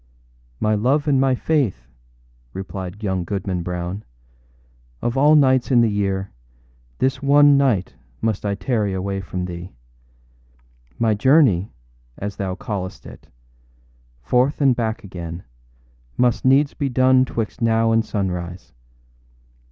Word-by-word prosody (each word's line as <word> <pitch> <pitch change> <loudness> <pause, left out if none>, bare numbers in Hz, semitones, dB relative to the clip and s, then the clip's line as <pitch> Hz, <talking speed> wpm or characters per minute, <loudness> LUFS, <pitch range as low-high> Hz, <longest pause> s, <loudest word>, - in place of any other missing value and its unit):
â 110 0 +1
âMy 105 - -2
love 145 +6 +1
and 135 -2 +3
my 135 -1 +3
Faith,â 125 - -1 0.7
replied 95 +1 -7
young 95 -3 -1
Goodman 95 -1 -3
Brown, 90 +3 -4 1.0
âof 120 - -1
all 145 +3 +5
nights 130 -4 +3
in 125 -3 +5
the 115 -2 +2
year, 100 -1 -2 0.7
this 130 - 0
one 145 +1 +6
night 125 -10 +1 0.3
must 110 -3 -1
I 100 -1 -1
tarry 100 0 -1
away 95 +1 -3
from 90 0 -5
thee. 90 0 -8 1.2
My 115 -2 +2
journey, 115 - +3 0.5
as 100 0 -5
thou 95 -2 -3
callest 95 -1 -6
it, - - -13 1.0
forth 125 - +1
and 135 -4 +4
back 115 -2 -2
again, 85 -3 -7 0.7
must 125 -1 +1
needs 140 +2 +4
be 140 -3 -2
done 130 +1 +4
âtwixt 115 -4 -4
now 115 0 +2
and 115 0 +3
sunrise. 90 -4 -4
110 Hz, 130 wpm, -21 LUFS, 95-130 Hz, 1.2 s, one